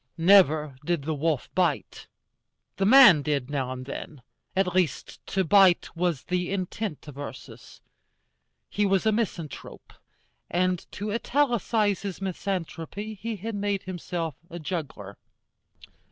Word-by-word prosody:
Never 160 -6 +4
did 170 -2 -1
the 160 +2 -2
wolf 155 -2 -1
bite: 170 -6 -1 0.7
the 195 - +2
man 235 - +8
did 140 -2 -2
now 135 -3 -2
and 130 0 -6
then. 140 0 -8 0.3
At 185 -2 +1
least, 180 -7 -1
to 190 - 0
bite 185 0 +4
was 170 -5 -1
the 180 0 -2
intent 195 -3 -4
of 145 -1 -10
Ursus. 130 -4 -10 0.9
He 210 - -1
was 195 -1 +2
a 220 - +4
misanthrope, 190 - -4 0.6
and 180 0 -1
to 205 +1 -4
italicize 230 -5 +1
his 200 -3 -5
misanthropy 195 +1 -4
he 220 +2 -5
had 220 +4 -5
made 200 -1 -1
himself 175 -3 -4 0.2
a 170 - -7
juggler. 150 - -6
180 Hz, 130 wpm, -26 LUFS, 155-200 Hz, 0.9 s, man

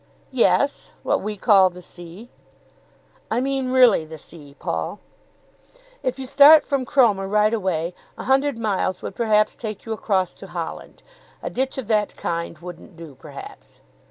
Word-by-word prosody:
"Yes; 265 +2 +1
what - - 0
we 210 +1 -4
call 195 -3 +5
the 180 0 -13
sea." 175 +7 -12 1.0
"I 225 - 0
mean 270 0 -1
really 250 -9 +5
the 160 0 -10
sea, 145 -2 -13
Paul?" 80 - -4 1.0
"If 255 0 -2
you 265 - -6
start 285 +4 +7
from 275 -3 -1
Cromer 220 -7 +3
right 210 +2 +2
away, 180 -5 -1 0.2
a - - -6
hundred 270 0 +1
miles 195 -4 -1
would - - -5
perhaps 215 -2 +2
take 215 -3 -7
you 225 - -3
across 190 -4 -1
to 195 - -9
Holland. 175 -2 -7 0.4
A - - -4
ditch 265 +1 -2
of 265 - -4
that 210 -2 0
kind 170 -1 -4
wouldn't 175 +2 -11
do 165 -3 -11
perhaps." - - -12
210 Hz, 155 wpm, -22 LUFS, 175-255 Hz, 1.0 s, start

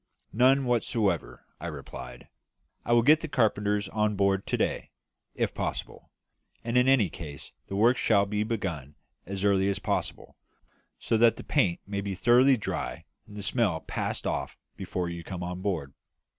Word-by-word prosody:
"None 130 +4 +4
whatever," 100 - 0
I 85 - -5
replied; 65 -5 -8 0.6
"I - - -3
will 120 -1 +5
get 155 +5 +6
the 160 - -4
carpenters 105 -6 +1
on 105 0 0
board 100 0 +1
to - - 0
day, - - -1 0.5
if - - -1
possible; - - -5 0.5
and 115 +1 -3
in 125 +1 +4
any 135 -7 +5
case 75 -4 -9 0.2
the 95 - -5
work 120 +6 +4
shall 100 -3 +3
be 105 +1 -2
begun 90 - -3 0.3
as 95 0 -4
early 100 -1 +3
as 100 - -1
possible, - - -3 0.6
so 115 - 0
that 115 0 +5
the - - -8
paint 85 -4 +1
may 100 0 -3
be 100 -1 -4
thoroughly 125 +7 +5
dry 105 - -4 0.2
and 105 - -11
the 100 - -5
smell 100 -9 0
passed - - -4
off - - -3 0.2
before 90 -1 -3
you 85 0 -6
come 90 -1 -6
on 90 +1 -5
board." 85 -9 -2
100 Hz, 170 wpm, -28 LUFS, 90-115 Hz, 0.6 s, get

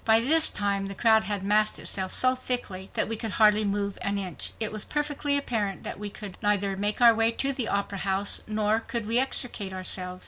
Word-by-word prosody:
By 225 0 +5
this 310 +7 +5
time 200 -1 -2
the 195 - -6
crowd 220 +1 +3
had 205 -2 -3
massed 210 +2 +2
itself 190 -1 -2
so 255 0 +2
thickly 245 -7 -4
that - - 0
we 225 - -2
could 220 -1 -4
hardly 215 -1 +4
move 200 0 -3
an 200 0 -2
inch. 185 -4 -3
It 220 -2 +1
was 215 -1 -2
perfectly 290 -1 -1
apparent 220 -8 -3
that - - -6
we 210 0 -5
could 200 -2 -9
neither 200 -1 +1
make 205 +4 -1
our 235 -1 +7
way 225 +1 +2
to 275 +3 0
the 255 -4 -2
Opera 200 -1 -2
House 195 +1 +2
nor 215 0 0
could 230 -1 -4
we 230 +3 +3
extricate 240 -7 -2
ourselves. 185 -1 -3
210 Hz, 215 wpm, -26 LUFS, 200-230 Hz, -, our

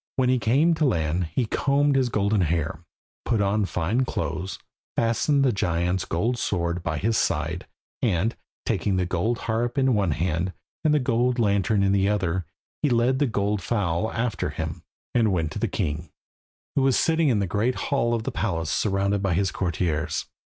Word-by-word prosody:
When 130 -2 +2
he 130 0 +3
came 135 +10 +3
to 160 -1 +1
land, 85 - +1
he 80 - -1
combed 140 +5 +2
his 130 -2 +2
golden 105 -2 +1
hair, 80 -2 -1 0.4
put 115 - 0
on 100 +1 +2
fine 95 +8 0
clothes, 85 - -3 0.4
fastened 130 +5 +2
the 130 - +4
giant's 90 -1 0
gold 115 +9 -1
sword 85 -4 -1
by 80 -3 -2
his 110 +6 +1
side, 125 - -1 0.3
and, 110 -1 +1 0.3
taking 100 - 0
the 90 -1 +1
gold 95 +7 0
harp 115 +3 -1
in 135 -1 +3
one 100 -4 +1
hand 85 +3 -1 0.3
and 155 - +3
the 150 - +4
gold 125 -1 +1
lantern 100 -2 +2
in 95 - +3
the 100 0 +2
other, 95 -4 -1 0.3
he 150 - +2
led 125 +2 +2
the 145 - +3
gold 105 -2 0
fowl 100 0 0
after 115 -1 -1
him, - - -5 0.3
and 115 -3 +3
went 80 -4 0
to - - -5
the - - +1
king, 75 +2 -3 0.7
who 140 - +3
was 135 -2 +3
sitting 165 -2 +3
in 120 - +2
the 100 - +1
great 110 +7 0
hall 120 -4 0
of 115 - -3
the - - -3
palace 85 -5 -2
surrounded 100 +2 +1
by 95 -4 +1
his 95 +1 +1
courtiers. 85 -3 -1
100 Hz, 185 wpm, -25 LUFS, 90-120 Hz, 0.7 s, the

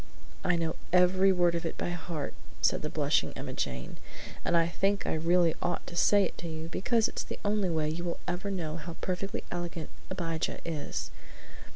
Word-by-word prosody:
"I 180 - +3
know 165 -1 -1
every 185 +2 +6
word 175 -2 +4
of 170 0 -1
it 165 - -3
by - - -1
heart," 165 -3 -4 0.3
said - - +3
the - - -2
blushing - - +2
Emma - - -5
Jane, 65 -1 -3 0.5
"and 170 - +3
I 165 0 +4
think 195 +3 +1
I - - +1
really 170 +1 +4
ought 175 - -1
to 170 - -8
say 205 +3 +5
it - - -3
to 170 - -4
you, 160 0 -5
because 225 +5 +2
it's - - -3
the - - -6
only 205 -2 +2
way 160 -2 +1
you 160 +3 -2
will 170 - -2
ever 180 +3 -1
know 170 -5 -2
how 165 +1 -6
perfectly 190 +2 -2
elegant 175 -2 -4 0.2
Abijah 165 -4 -1
is. 160 -3 -3
175 Hz, 195 wpm, -30 LUFS, 165-185 Hz, 0.5 s, every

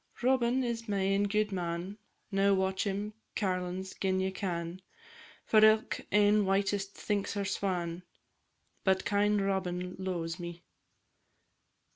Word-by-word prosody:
Robin 255 0 +3
is 230 -2 -3
my 200 - 0
ain 195 +1 +2
gudeman, 190 -3 -1 0.4
Now 195 0 +4
match 190 +1 0
him, 205 +2 -2 0.2
carlins, 185 -1 -2
gin 190 -1 0
ye 190 0 0
can, 175 -2 -4 0.6
For 215 -1 +5
ilk 215 0 +4
ane 210 0 +5
whitest 195 0 0
thinks 205 -1 -2
her 200 -1 -1
swan, 180 -3 -2 0.8
But 190 0 +2
kind 205 0 +2
Robin 180 -2 -1
lo'es 175 -2 -3
me. 170 0 -7
195 Hz, 120 wpm, -31 LUFS, 185-205 Hz, 0.8 s, For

